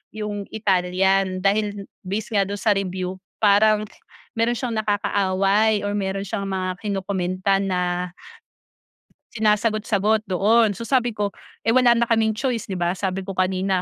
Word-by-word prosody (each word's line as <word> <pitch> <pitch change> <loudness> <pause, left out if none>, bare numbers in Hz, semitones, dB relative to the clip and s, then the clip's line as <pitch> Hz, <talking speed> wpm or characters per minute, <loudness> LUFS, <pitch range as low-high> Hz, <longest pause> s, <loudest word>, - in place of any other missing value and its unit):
yung 210 -1 -4
Italian, 190 -2 +1
dahil 205 0 0 0.2
base 210 +4 -4
nga 195 - +4
do'n 205 +1 -4
sa 215 - +3
review, 185 -1 -3 0.2
parang, 215 +1 +4 0.5
meron 235 +2 +2
siyang 245 -3 -3
nakakaaway 205 0 +1
or 205 - -1
meron 195 0 -2
siyang 200 0 -3
mga 185 -1 -2
kino-comment 190 -3 -3
tan 195 0 +2
na 180 0 -1 1.2
sinasagot-sagot 215 -1 +1
doon. 205 +2 +3
So, 230 - -6
sabi 245 -1 +2
ko, 205 -2 -3 0.3
eh, 225 - +3
wala 245 -2 +5
na 235 - +2
kaming 220 -2 +1
choice, 245 -5 -2
'di 190 - -3
ba, 175 0 0
sabi 190 0 -3
ko 195 - -5
kanina, 185 0 0
200 Hz, 150 wpm, -22 LUFS, 190-215 Hz, 1.2 s, wala